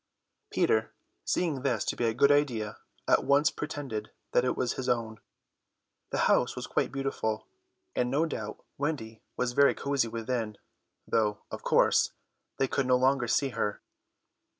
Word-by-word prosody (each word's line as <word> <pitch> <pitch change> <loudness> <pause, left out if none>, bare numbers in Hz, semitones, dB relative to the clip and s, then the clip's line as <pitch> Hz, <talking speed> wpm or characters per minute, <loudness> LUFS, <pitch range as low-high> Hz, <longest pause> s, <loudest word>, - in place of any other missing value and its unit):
Peter, 110 0 +2 0.3
seeing 160 -7 0
this 125 -6 0
to - - -1
be 120 - 0
a 115 - +2
good 140 +3 +5
idea, 120 -8 +1 0.3
at - - +4
once 140 +2 +4
pretended 135 -8 -5 0.2
that 125 - +3
it 125 - 0
was 125 -1 0
his 130 - -3
own. 115 -3 -1 0.9
The - - -2
house - - +3
was - - -4
quite - - 0
beautiful, 135 -5 -2 0.5
and 125 - +1
no 145 +5 +2
doubt 110 -9 -6
Wendy 130 -7 -3 0.2
was 125 -1 0
very 140 +2 +5
cosy 140 -4 0
within, 115 -1 -3 0.5
though, 105 -2 +1
of - - -5
course, - - +3 0.4
they 135 - +2
could 135 0 0
no 125 0 +5
longer 130 -1 +2
see 135 +4 +2
her. 105 -4 -2
125 Hz, 155 wpm, -29 LUFS, 110-140 Hz, 0.9 s, good